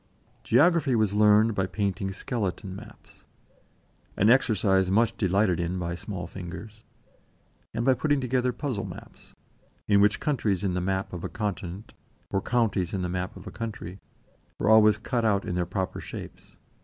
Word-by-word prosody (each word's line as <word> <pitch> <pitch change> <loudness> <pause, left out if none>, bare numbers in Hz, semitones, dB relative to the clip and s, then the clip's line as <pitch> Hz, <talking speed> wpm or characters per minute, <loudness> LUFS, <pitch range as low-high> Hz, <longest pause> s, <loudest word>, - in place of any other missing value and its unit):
Geography 150 +2 +4
was 110 -3 +2
learned 105 +1 +5
by 95 -2 0
painting 95 0 -2
skeleton 95 -3 -4
maps 100 - -14 0.9
an 105 +4 +5
exercise 100 -7 +3
much 110 +4 +2
delighted 95 -2 +1
in 85 +2 -2
by 85 -1 -3
small 90 0 -6
fingers 95 +5 -9 0.9
and 115 - -1
by 130 - +5
putting 145 +2 +1
together 125 0 0
puzzle 125 -5 -3
maps, - - -11 0.5
in 100 -1 +5
which 105 +1 +3
countries 110 - 0
in 95 -2 0
the 90 - -1
map 95 +1 -2
of 90 - -6
a - - -3
continent, 100 -2 -5 0.4
or 95 - 0
counties 100 -8 0
in 95 - -2
the 90 - -2
map 90 +1 -4
of 95 - -12
a 105 - -7
country, 105 -5 -6 0.6
were 105 - +2
always 110 -1 +6
cut 120 +2 -2
out 100 -3 +2
in - - -3
their 90 -1 -1
proper 95 +1 -3
shapes. - - -10
100 Hz, 165 wpm, -27 LUFS, 95-115 Hz, 0.9 s, always